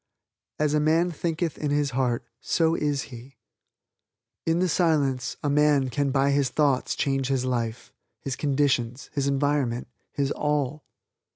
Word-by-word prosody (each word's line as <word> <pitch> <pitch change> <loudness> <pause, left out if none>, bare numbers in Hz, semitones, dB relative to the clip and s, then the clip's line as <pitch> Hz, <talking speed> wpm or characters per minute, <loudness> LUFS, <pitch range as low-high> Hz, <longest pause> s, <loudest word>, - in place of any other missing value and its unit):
"As 150 -1 +1
a 150 - +3
man 165 +4 +2
thinketh 165 0 -2
in 150 - -1
his 145 -1 +1
heart 125 -2 0
so 160 +3 +1
is 145 -3 0
he." 125 +3 -11 1.1
In 165 +1 +3
the 185 +1 +2
Silence 145 -8 +1
a 145 - +1
man 145 -3 +3
can 140 +3 0
by 135 +1 +2
his 140 -2 +2
thoughts 140 -1 +1
change 135 -2 0
his 135 -2 0
life, 120 -2 -3 0.3
his 135 -2 -4
conditions, 135 -4 0
his 140 -2 0
environment, 140 -4 0 0.2
his 140 0 -1
all. 150 -1 -1
140 Hz, 150 wpm, -26 LUFS, 130-150 Hz, 1.1 s, a